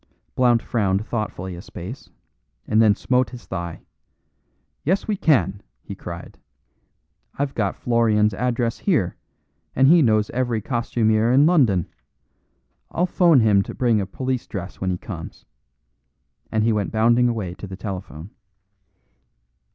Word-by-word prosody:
Blount 120 -2 +3
frowned 100 -3 0
thoughtfully 105 -6 -4
a 85 - -8
space, 95 +11 -9 0.6
and 110 - +3
then 105 -2 +5
smote 125 +4 +1
his 125 -2 -11
thigh. 85 -3 -5 1.0
"Yes, 185 +6 0
we 215 - 0
can!" 125 - +2 0.2
he - - -7
cried. - - -9 1.0
"I've 140 -1 -1
got 100 -4 -1
Florian's 110 -3 +2
address 120 +2 -1
here, 155 - 0 0.6
and 135 +1 +5
he 170 +3 +6
knows 110 -5 +2
every 120 -3 -1
costumier 115 -1 +1
in 135 +3 +5
London. 125 - +3 1.0
I'll 175 - 0
phone 170 -6 +4
him 105 -3 +4
to - - -6
bring 115 -4 +2
a 95 - -4
police 130 +4 -3
dress 95 -3 -7
when 95 - -1
he 90 - -1
comes." - - -9 1.1
And 110 -1 +1
he 115 0 +2
went 105 -2 -1
bounding 120 +2 +3
away 105 -7 -3
to 100 - -9
the 95 0 -8
telephone. 95 -3 -7
110 Hz, 140 wpm, -22 LUFS, 100-125 Hz, 1.1 s, he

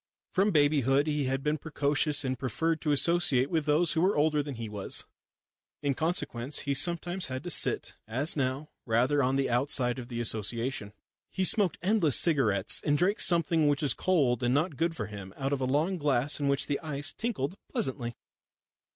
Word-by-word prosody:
From 195 +3 +2
babyhood 145 - +2
he 150 -2 -1
had 135 +1 -2
been 150 0 -1
precocious 145 -1 +1
and 130 0 -1
preferred 160 +5 -1
to 150 - 0
associate 145 -3 +3
with 160 -3 -1
those 155 +2 +3
who 160 - 0
were 190 0 +2
older 150 0 +2
than 140 -2 -6
he 115 -1 -6
was. 105 -2 -1 0.8
In 140 -1 +1
consequence 145 -4 -2
he 140 - -1
sometimes 175 +4 0
had 130 +1 -5
to 175 - -1
sit, - - +1
as 130 +8 -1
now, 135 +2 -2 0.2
rather 125 +6 +2
on 130 0 +1
the 135 0 +1
outside 125 0 0
of 120 - -8
the 120 -2 -5
association. 115 0 -2 0.4
He 190 - -2
smoked 190 -2 +2
endless 180 - +3
cigarettes 110 - +2
and 145 -1 +1
drank 195 +7 +1
something 165 -2 +3
which 145 +1 +1
was 145 - +1
cold 140 -10 +1
and 120 +1 +1
not 155 +1 0
good 165 +3 -1
for 110 - -4
him 100 -2 -10
out 135 +1 -2
of 135 - -2
a - - 0
long 155 +8 0
glass 145 -1 +1
in 145 - -1
which 140 0 +2
the 145 - -2
ice 145 -3 -2
tinkled 190 - -3
pleasantly. 130 - -2
145 Hz, 190 wpm, -29 LUFS, 130-160 Hz, 0.8 s, associate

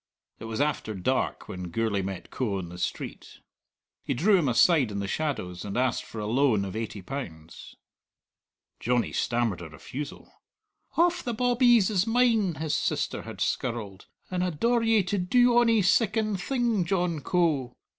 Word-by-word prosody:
It - - -8
was 115 +1 -4
after 145 -7 -1
dark 90 - -1
when 90 -1 -6
Gourlay 105 +2 0
met 95 -2 -6
Coe 110 -7 -1
on 90 -3 -5
the 90 +1 -9
street. - - -5 0.6
He - - -2
drew 195 - +4
him 165 -8 +2
aside 135 +1 +4
in 100 - -5
the 100 0 -2
shadows, 95 - -3
and 100 +1 -4
asked 130 +1 0
for 110 - -8
a 105 - -3
loan 115 -3 +2
of 95 +1 -6
eighty 110 -3 -5
pounds. 85 - -8 1.0
Johnny 120 0 0
stammered 120 -7 0
a 85 - -8
refusal. 135 - -9 0.5
"Hauf 350 +1 +3
the 240 -2 -3
bawbees 240 -3 +4
is 195 +1 +1
mine," 225 -6 +3
his 155 +1 -2
sister - - -1
had - - -9
skirled, 110 -6 -3 0.2
"and 180 -1 0
I 180 - +1
daur 235 +9 +1
ye 225 -3 +3
to 195 +2 -1
do 240 +6 +4
ony 230 -3 +4
siccan 215 +2 +2
thing, 230 +1 0
John 175 -3 0
Coe!" 150 -7 0
150 Hz, 165 wpm, -27 LUFS, -, 1.0 s, drew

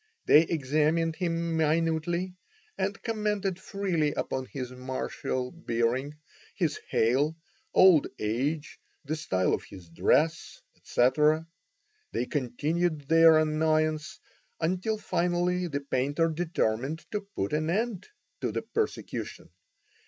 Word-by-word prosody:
They 150 - +8
examined 155 +1 +1
him 170 -2 -1
minutely, 165 +3 +1 0.4
and 200 +1 -2
commented 210 -4 -1
freely 185 -7 -1
upon 130 0 -3
his 130 -3 -6
martial 130 0 -3
bearing, 130 -2 -1 0.4
his - - 0
hale, 135 +8 +2 0.4
old 180 -6 +6
age, 140 +9 -2 0.3
the 155 +3 -2
style 95 -12 0
of - - -1
his 90 -3 -13
dress, 150 - +1 0.2
etc. 150 +6 +2 0.7
They 125 - 0
continued 150 +4 -1
their 165 -1 +7
annoyance 155 0 +1 0.4
until 185 +6 0
finally 180 -1 0
the 140 -3 -3
painter 140 +4 0
determined 155 -4 -1
to 210 - -1
put 175 - -4
an 155 +1 0
end 210 +1 -1 0.3
to - - -1
the - - -3
persecution. 440 -1 -4
155 Hz, 110 wpm, -28 LUFS, 140-175 Hz, 0.7 s, They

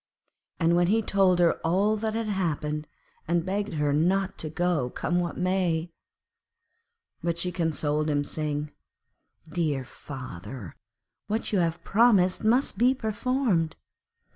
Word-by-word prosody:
And 170 0 +3
he 225 +2 +3
told 195 -3 +3
her 175 -1 +3
all 195 +6 +2
that 220 +1 -2
had 230 0 -1
happened, 155 -6 -2 0.4
and 170 0 +1
begged 200 0 -2
her 150 -1 +1
not 190 +5 +1
to 155 - -3
go, 165 -5 0
come 175 +7 -1
what 175 -1 -2
might. 180 -3 0 1.3
But 170 -1 -1
she 180 +1 -1
consoled 155 -3 0
him, 145 -1 +1
saying, 150 0 -3 0.8
'Dear 155 -5 -1
father, 120 - -8 0.5
what 220 +2 -2
you 195 - +3
have 165 -1 -1
promised 195 -5 +4
must 240 +5 +2
be 250 +2 +4
performed. 220 - 0
175 Hz, 130 wpm, -27 LUFS, 155-200 Hz, 1.3 s, promised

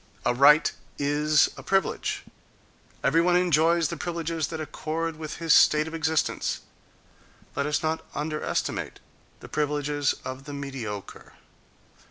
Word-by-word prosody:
—A - - +3
right 150 +4 +6 0.3
is 150 +1 +3
a - - -7
privilege. 195 -4 0 0.8
Every 165 +4 +4
one 175 +1 +3
enjoys 170 -2 +3
the - - -4
privileges 165 -2 -2
that 160 -1 -6
accord 160 +1 -3
with 155 -1 -6
his 165 -2 +2
state 150 +1 +5
of 160 - -7
existence. 160 -1 0 0.9
Let 140 - 0
us 150 - 0
not 160 +1 -1
underestimate 150 +1 -2 0.4
the - - -9
privileges 145 -1 0
of 130 +1 -6
the 145 - -7
mediocre. 130 -8 -6
150 Hz, 130 wpm, -26 LUFS, 145-165 Hz, 0.9 s, right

